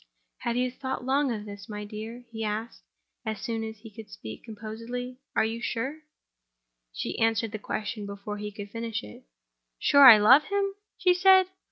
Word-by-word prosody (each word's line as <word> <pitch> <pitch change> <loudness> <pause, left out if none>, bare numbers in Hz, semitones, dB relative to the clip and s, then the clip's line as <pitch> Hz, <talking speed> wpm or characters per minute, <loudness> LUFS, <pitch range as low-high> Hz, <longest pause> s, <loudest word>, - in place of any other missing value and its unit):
"Have 235 - -2
you 250 0 +1
thought 260 0 -5
long 275 +1 +2
of 210 -2 -4
this, 200 -1 -10
my 210 -1 -5
dear?" 220 +4 -8
he 225 -1 -5
asked, 215 +2 -4 0.4
as 220 -3 -3
soon 225 +1 -3
as 220 0 -6
he 220 +1 -13
could 215 0 -11
speak 110 - -9
composedly. 230 +3 -7 0.2
"Are - - +3
you 225 +1 -3
sure—?" 265 +7 -3 0.9
She - - -4
answered 225 -1 +1
the 215 - -5
question 210 0 -4
before 200 +1 -6
he 210 0 -5
could 205 0 -9
finish 230 - -4
it. 105 0 -12 0.5
"Sure 280 - +6
I 230 -4 +12
love 255 +8 +7
him?" 400 0 0 0.2
she 365 -1 +4
said. 375 0 +6
225 Hz, 180 wpm, -27 LUFS, 210-250 Hz, 0.9 s, I